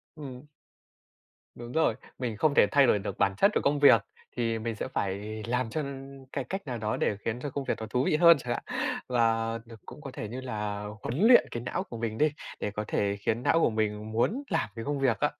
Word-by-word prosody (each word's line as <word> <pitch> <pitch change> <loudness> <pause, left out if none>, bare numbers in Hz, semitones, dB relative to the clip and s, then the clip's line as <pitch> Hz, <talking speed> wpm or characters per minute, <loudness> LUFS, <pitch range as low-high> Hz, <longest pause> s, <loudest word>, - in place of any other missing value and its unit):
Ừm. 140 -2 -9 1.1
Đúng 120 0 -8
rồi, 160 -7 +2 0.2
mình 115 -4 -3
không 145 +5 +3
thể - - +6
thay 140 -3 +5
đổi 105 - +4
được 100 0 -5
bản 100 - +2
chất 200 - +5
của - - +1
công 145 +1 +2
việc 140 -7 +7 0.4
thì 115 -1 0
mình 115 0 -3
sẽ - - -4
phải 105 +3 -3
làm 125 -1 0
cho 155 +6 -2 0.5
cái 140 - -2
cách 195 +9 -5
nào 125 -2 -3
đó 110 -1 -2
để 100 - 0
khiến 115 +2 -1
cho 145 - -3
công 140 +1 -4
việc - - 0
nó 110 - -4
thú 125 +1 +1
vị - - +2
hơn 170 0 +7
chẳng 125 -3 -3
hạn - - -4 0.4
và 115 -2 +1
đ 115 - -16
cũng 150 - -11
có 140 -3 -7
thể 110 - -5
như 125 +4 -5
là 105 -5 -4 0.2
huấn 125 - -3
luyện 245 - +8
cái 120 0 -4
não - - -2
của 120 - -9
mình 110 -1 -3
đi 155 -1 +3 0.3
để 105 - -2
có 105 +1 -3
thể 100 0 0
khiến 115 +4 -1
não 165 - +4
của - - +4
mình 110 -1 -2
muốn 205 - 0
làm 165 - 0
cái 115 +1 -6
công 145 -1 -1
việc 120 -6 +2
á. - - +2
120 Hz, 240 wpm, -28 LUFS, 110-140 Hz, 1.1 s, luyện